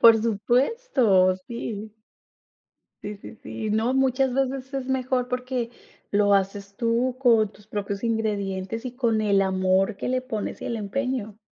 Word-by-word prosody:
Por 230 -1 +8
supuesto, 230 - +3
sí. 220 -3 -5 1.1
Sí, 210 +1 -5
sí, 215 - -11
sí, 220 - -4
no, 220 +4 +1
muchas 265 -1 +2
veces 265 0 -1
es 270 -2 -3
mejor 255 -1 0
porque 250 -1 -2 0.4
lo 205 0 +4
haces 200 0 0
tú 240 +2 +1
con 225 -5 +4
tus 210 0 -20
propios 200 -1 -4
ingredientes 215 -1 -2
y 250 - -3
con 230 -4 +1
el 200 -2 +3
amor 190 +2 +2
que - - -3
le 255 0 +1
pones 225 -5 -4
y - - -5
el 235 - -2
empeño. 220 0 -3
225 Hz, 150 wpm, -25 LUFS, 205-255 Hz, 1.1 s, Por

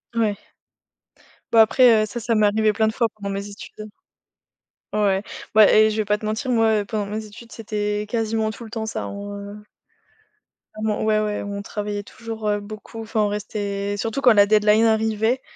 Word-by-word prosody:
Ouais. 215 -3 +1 1.2
Bah 225 - +6
après, 230 -1 +5
heu, - - 0
ça, 240 +3 -6
ça 230 +1 0
m'est 215 -1 +4
arrivé 215 +1 +2
plein 220 +1 +1
de - - -2
fois 230 -2 +1
pendant 200 -2 -6
mes 200 +1 -4
études. 210 +1 -10 1.0
Ouais, 200 -2 +1 0.3
bah 215 -2 +7
et 215 0 +6
je 215 - -3
vais 215 - 0
pas 210 +1 0
te 215 - -7
mentir, 230 +5 -2
moi, 220 -2 +3
heu, - - -7
pendant 210 -2 -3
mes 215 +1 -4
études, 230 +3 -13
c'était 210 -1 -3
quasiment 220 -1 -1
tout 235 - -10
le 220 - -10
temps 220 -1 -4
ça, 220 - -4
hein, - - -5
en, 200 0 -7
heu 205 +1 -9 1.2
ment 215 -1 -1
ouais, 215 -1 +2
ouais. 210 -1 -2
On 200 0 -5
travaillait 205 0 -4
toujours, 220 0 -7
heu, 205 0 +1
beaucoup. 215 +2 -9
Enfin, 220 0 -1
on 210 - +2
restait, 205 -1 -3
surtout 225 +6 -3
quand 245 -4 +6
la 205 -1 +6
deadline 215 +1 +4
arrivait. 220 +2 +1
215 Hz, 200 wpm, -22 LUFS, 205-220 Hz, 1.2 s, bah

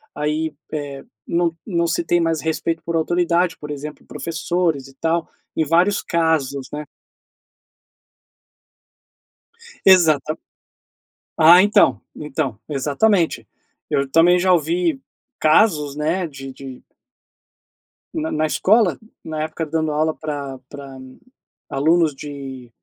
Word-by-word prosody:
aí, 150 +1 -1 0.2
eh, 145 -2 -5 0.2
não 170 -1 +1
não 170 -4 0
se 170 +1 0
tem 175 +1 +2
mais 165 -1 0
respeito 160 +1 -2
por 170 0 -3
autoridade, 175 +1 +1
por 150 - -9
exemplo, 150 +1 -7
professores 165 -3 -2
e 135 - -16
tal, 165 +2 -1 0.3
em 160 - +2
vários 175 +6 +3
casos, 155 -6 0
né. 150 0 -5 3.0
Exatam 160 -5 +5 1.0
ah, 170 +3 +8
então 205 +1 +4
então, 140 -6 -3
exatamente, 155 +6 +1 0.4
eu 140 -1 0
também 170 +4 +5
já 185 +1 +3
ouvi 165 -2 +1 0.4
casos, 155 -4 +3
né, 165 +4 -1
de 135 -2 -9
de 130 -1 -10 1.3
na 320 -1 -2
na 155 +1 +1
escola, 205 +4 +3 0.3
na 155 -1 -3
época 160 +1 -4
dando 155 0 -1
aula 155 +1 +1
pra 140 -4 -5
pra 140 -2 -10 0.7
alunos 160 +2 +2
de 135 -3 -8
160 Hz, 115 wpm, -21 LUFS, 145-170 Hz, 3.0 s, ah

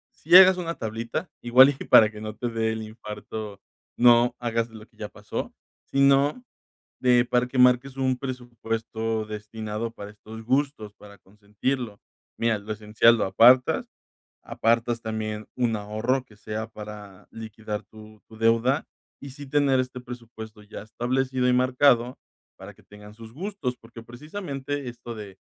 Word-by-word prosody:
si 170 +4 +2
hagas 190 -1 +8
una 170 -2 -4
tablita 115 +9 -4
igual 125 +3 +7
y - - -7
para 110 - +7
que 105 - -11
no 110 0 -6
te 120 - -4
dé 115 -1 -1
el 110 0 -4
infarto, 110 -1 -8 0.4
no 120 0 +5
hagas 115 -1 -1
lo 110 -1 -12
que - - -33
ya - - -7
pasó, - - -6 0.4
sino 140 - +3 0.6
de 125 -1 +4
para 125 0 +1
que 125 +1 -5
marques 125 +1 +4
un 130 -1 +1
presupuesto 115 -3 -4
destinado 110 +1 -5
para 105 -3 -9
estos 110 +1 -11
gustos 130 -3 -1
para 100 -1 -15
consentirlo. 105 +3 -5 0.4
Mira, 115 -2 +1
lo 105 +2 -6
esencial 110 +2 +3
lo - - +1
apartas, 125 +6 +4 0.5
apartas 115 +1 0
también 110 -1 -4
un 120 -3 0
ahorro 110 +5 -1
que 105 - -21
sea 110 +1 -5
para 105 -3 -11
liquidar 110 -1 -7
tu 110 0 -16
tu 110 - -14
deuda 115 +5 +2 0.3
y 140 - -9
sí 145 +2 -11
tener 140 -1 +2
este 125 0 -7
presupuesto 115 -3 -10
ya 105 - -10
establecido 125 +3 -1
y - - +3
marcado 125 -1 +3 0.4
para - - -11
que - - -22
tengan 105 0 -14
sus 115 0 -13
gustos, 180 - -4
porque 115 0 -13
precisamente 140 - -6
esto 120 0 -8
de 100 -3 -10
115 Hz, 155 wpm, -25 LUFS, 110-130 Hz, 0.6 s, hagas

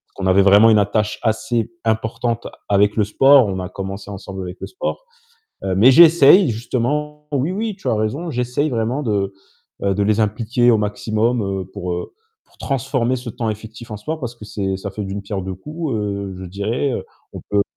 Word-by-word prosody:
qu'on 95 - -4
avait 95 +1 +5
vraiment 100 +3 +7
une 110 - +5
attache 105 +1 0
assez 115 +1 0
importante 115 +1 -1 0.2
avec 105 +1 +3
le 105 - +4
sport. 135 +4 +5
On 95 -1 -3
a 90 - -4
commencé 100 +1 -6
ensemble 95 -1 -7
avec 90 +1 -7
le - - -5
sport, - - -5 0.6
heu, 95 - -1
mais 110 +7 +6
j'essaie 165 +3 +7
justement, 150 +6 -2
oui, 145 +5 0
oui, 215 +1 -3
tu - - -8
as - - +2
raison. 130 +11 -2
J'essaie 125 +4 -1
vraiment 120 +4 -1
de, 100 -4 0 0.5
heu, 100 -1 +1
de 100 - +1
les 105 +1 +2
impliquer 115 +3 +1
au 110 - +4
maximum, 110 +3 0
heu, 95 -1 -3
pour, 90 0 -4
heu, 90 - -5 0.3
pour - - -28
transformer 130 -2 -1
ce 120 -1 -7
temps 115 0 -3
effectif 110 +2 -8
en 105 - -3
soi 155 +10 -5
parce 120 -4 -5
que 110 - -13
c'est 95 -2 -3
ça 100 +1 -6
fait 105 +1 -5
d'une 100 +1 -4
pierre 100 -1 -4
deux 95 0 -5
coups, 150 - -5
heu, 100 -2 -3
je 95 - -7
dirais, 105 +9 -2
heu, - - -4 0.3
on - - -6
peut 100 0 +3
110 Hz, 205 wpm, -20 LUFS, 100-125 Hz, 0.6 s, vraiment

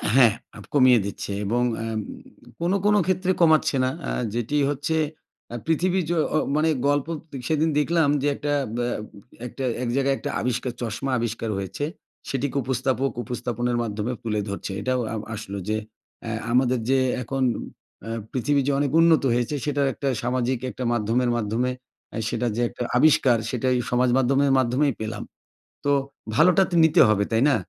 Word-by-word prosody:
হ্যাঁ, 120 -5 +7 0.2
আপ - - -10
কমিয়ে 130 -4 +6
দিচ্ছে 100 0 -5
এবং 120 +4 +1 0.2
অ্যাম 115 -1 -2 0.6
কোনো 175 +3 +1
কোনো 210 0 +5
ক্ষেত্রে 185 0 +1
কমাচ্ছে 160 -3 +4
না, 130 - +2 0.2
আ - - -2 0.2
যেটি 120 +4 -2
হচ্ছে 145 +3 -1 0.6
আ - - -3
পৃথিবী 180 +4 +1
যো 175 - +1 0.2
ও - - +4 0.2
মানে 155 +2 +2 0.2
গল্প 145 0 +1 0.2
তে 140 - -10
সেদিন 160 +1 +2
দেখলাম 160 0 +2
যে, 145 - +1
একটা 145 0 -2 0.2
ব্যা 120 0 0 0.6
একটা 135 +3 -7 0.2
এক 120 - -1
জায়গায় 135 0 +2
একটা - - -5
আবিষ্কার, 125 0 -1
চশমা 120 +4 -3
আবিষ্কার 115 -1 -3
হয়েছে। 100 +9 -3 0.4
সেটিকে 140 +1 -2
উপস্থাপক 130 +1 0
উপস্থাপনের 120 +1 -2
মাধ্যমে 110 +2 -3
তুলে 105 -2 -1
ধরছে। 100 0 -5
এটাও 130 +2 0
আ - - -2 0.2
আসলো 100 -1 -6
যে, 110 - +1 0.5
অ্যা 115 - -4 0.2
আমাদের 125 0 +3
যে 135 - +4 0.3
এখন 135 +3 -2 0.6
অ্যা 115 - -6 0.2
পৃথিবী 140 +2 +1
যে - - +3
অনেক 140 -2 0
উন্নত 165 -3 +5
হয়েছে, 120 +4 0
সেটার 145 -2 +1
একটা 140 - -4 0.2
সামাজিক 125 0 0
একটা 125 - -6
মাধ্যমের 120 +2 +1
মাধ্যমে, 115 +3 0 0.4
অ্যা - - -4
সেটা 120 0 -1
যে 120 - -1
একটা - - -5
আবিষ্কার, 130 -4 +5
সেটাই 130 +1 0 0.2
সমাজ 125 +1 +3
মাধ্যমের 135 +2 +3
মাধ্যমেই 130 +3 +2
পেলাম। 110 0 -4 0.6
তো 145 - +3 0.4
ভালোটা 180 +6 +5
তো - - 0
নিতে 160 - +5
হবে, 100 -1 +2
তাই 115 +2 +3
না? 135 - +4
130 Hz, 165 wpm, -24 LUFS, 120-145 Hz, 0.6 s, হ্যাঁ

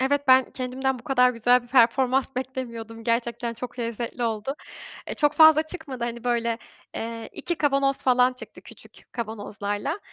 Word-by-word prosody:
Evet, 280 +1 0
ben 260 0 +6
kendimden 260 0 -2
bu 235 - -16
kadar 250 -2 +4
güzel 245 +1 +3
bir 240 - -18
performans 260 +2 +3
beklemiyordum. 235 -4 -6
Gerçekten 235 0 -1
çok 245 +1 -8
lezzetli 235 +1 -4
oldu. 225 +4 -2 0.5
E, - - -4
çok 295 -1 +2
fazla 315 -1 +7
çıkmadı 315 -7 -6
hani, 235 0 -5
böyle, 235 -1 0 0.4
eee, 230 0 -5
2 345 - -3
kavanoz 275 -2 +2
falan 250 0 +4
çıktı 250 - -11
küçük - - -16
kavanozlarla. 210 - -4
250 Hz, 155 wpm, -25 LUFS, 230-265 Hz, 0.5 s, fazla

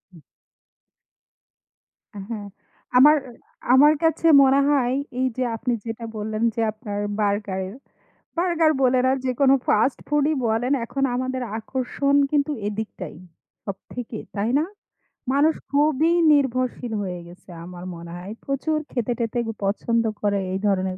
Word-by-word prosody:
উ 160 - -15 2.1
হ্যাঁ, 215 -3 -6 0.5
আমার 295 +4 +8 0.6
আমার 295 +3 +7
কাছে 325 0 +1 0.2
মনে 270 +1 +4
হয় 260 -4 +2 0.3
এইযে, 255 0 0
আপনি 245 +2 -1
যেটা 230 0 -5
বললেন 215 +1 -3
যে, 230 - 0
আপনার 210 -2 -6 0.2
burger 205 -2 0
এর 195 - -9 0.6
burger 335 -3 +3
বলেন 255 0 +3
আর 270 - +1
যেকোনো 265 +2 +3
fast 225 +5 +3
food-ই 295 +1 +2
বলেন 225 +4 0
এখন 275 +3 -3
আমাদের 255 0 -2 0.2
আকর্ষণ 265 +4 -1 0.2
কিন্তু 295 0 +1 0.2
এদিকটাই, 210 -5 -5 0.5
সবথেকে। 220 +4 -7 0.2
তাই 205 +3 0
না? 315 - 0 0.7
মানুষ 295 +3 +4 0.2
খুবই 300 +2 +3 0.2
নির্ভরশীল 255 -4 +1
হয়ে 180 -2 -4
গেছে 180 +2 -16 0.2
আমার 180 0 -9
মনে 170 0 -9
হয়। 185 +4 -8
প্রচুর 280 +3 -1
খেতে-টেতে 240 -1 -2 0.2
পছন্দ 230 +3 +1 0.2
করে 205 -1 +1
এই 190 - -2
ধরনের 190 -2 0
245 Hz, 125 wpm, -23 LUFS, 210-275 Hz, 2.1 s, আমার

